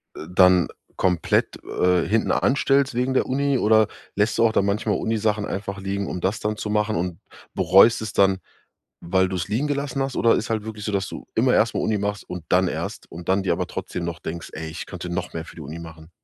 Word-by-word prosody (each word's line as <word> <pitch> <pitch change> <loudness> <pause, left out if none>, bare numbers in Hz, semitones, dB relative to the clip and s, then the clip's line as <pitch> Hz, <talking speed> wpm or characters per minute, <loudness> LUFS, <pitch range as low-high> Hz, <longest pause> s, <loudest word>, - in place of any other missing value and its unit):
äh, 80 - -8
dann 90 -1 +5 0.3
komplett, 90 -3 +1
äh, 90 -1 +1
hinten 110 +2 +1
anstellst 135 0 +2
wegen 125 +2 0
der - - +2
Uni 140 +1 +1
oder 110 -2 +4 0.3
lässt 105 +2 +1
du 115 - +4
auch 110 - +2
dann 100 - +2
manchmal 105 +1 0
Uni 115 0 -1
Sachen 105 -1 0
einfach 100 0 -4
liegen, 100 0 -3
um 90 - -4
das 100 +6 0
dann 105 0 -1
zu 105 - -4
machen 105 +1 +1
und 85 0 -2 0.3
bereust 110 +5 +5
es 110 -2 -5
dann, 95 -1 +4 0.6
weil 95 +2 +1
du 95 - -3
es 85 -2 -2
liegen 125 +8 0
gelassen 140 -2 -2
hast? 135 -1 -2
Oder 115 - +4
ist 110 - -2
halt 110 -2 -1
wirklich 110 -2 -6
so, 105 - -2
dass 100 -2 -1
du - - -9
immer - - +3
erst - - +3
mal - - 0
Uni 110 -2 0
machst 105 0 -3
und 90 -2 -7
dann 90 +1 +4
erst - - -5
und 85 +1 -8
dann 95 +1 +2
dir 95 - +2
aber - - -2
trotzdem 85 - -5
noch 85 -2 -4
denkst: 85 +2 -6
„Ey, 80 0 -5
ich 80 - -6
könnte 90 -2 -7
noch 85 +1 -3
mehr 80 0 -5
für - - -13
die 80 - -9
Uni 75 +3 -7
machen“? 80 -1 -11
100 Hz, 240 wpm, -23 LUFS, 90-110 Hz, 0.6 s, dann